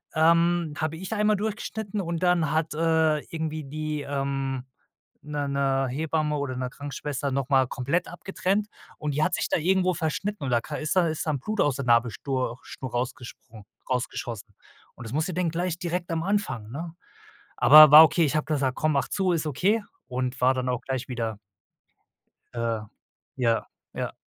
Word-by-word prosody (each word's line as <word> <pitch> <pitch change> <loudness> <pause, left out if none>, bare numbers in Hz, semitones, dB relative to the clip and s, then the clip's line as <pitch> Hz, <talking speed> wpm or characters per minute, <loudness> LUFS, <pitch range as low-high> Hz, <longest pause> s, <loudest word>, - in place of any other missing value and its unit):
ähm, 170 0 +3
habe 155 +1 -2
ich 190 +5 -5
einmal 210 0 +2
durchgeschnitten 215 0 -4
und 170 0 -3
dann 175 -4 +3
hat, 160 0 0
äh, 160 -1 +2
irgendwie 155 -2 -4
die, 150 +1 -4
ähm 135 -2 -2 0.6
'ne 145 -1 -3
'ne 135 -1 +1
Hebamme 150 +2 -1
oder 135 -3 -3
'ne 125 0 -3
Krankenschwester 145 0 -4
noch 135 +1 -2
mal 130 -2 +4
komplett 140 +10 -1
abgetrennt 195 +3 -2 0.3
und 150 -2 -3
die 150 - +1
hat 180 - +1
sich - - -2
da - - +2
irgendwo 185 +2 +2
verschnitten 175 +2 -3
oder 120 -2 +2
ist - - -14
ka 150 - -6
ist 155 +3 -2
da 175 -3 +3
ist 155 - -3
dann 150 -4 -1
Blut 215 +9 -4
aus 145 -3 +2
der 140 - -3
Nabelschnur 120 +1 +1
Schnur 130 -2 -8
rausgesprungen 120 -3 -6 0.2
rausgeschossen 120 -3 -4 0.4
und 120 - -10
das - - -8
musste 160 +4 -1
denn 175 -1 0
gleich 175 0 -2
direkt 175 0 -3
am 165 0 -1
Anfang, 155 - -2
ne? 165 +4 -6 0.6
Aber 155 0 +9
war 155 +2 +12
okay, 160 +2 +3
ich 150 - -1
habe 155 - +1
gesagt: 140 -4 0
„Komm, 155 -1 +1
mach 140 - +1
zu, 190 -3 +1
ist 160 -1 -1
okay“ 205 - +1 0.2
und 125 0 -3
war 130 +1 +5
dann 130 0 -2
auch 125 0 -1
gleich 130 -1 -4
wieder 115 -4 -3 1.2
äh, 115 -2 -2 0.5
ja, 115 -3 +1 0.3
ja. - - -4
150 Hz, 180 wpm, -26 LUFS, 130-170 Hz, 1.2 s, war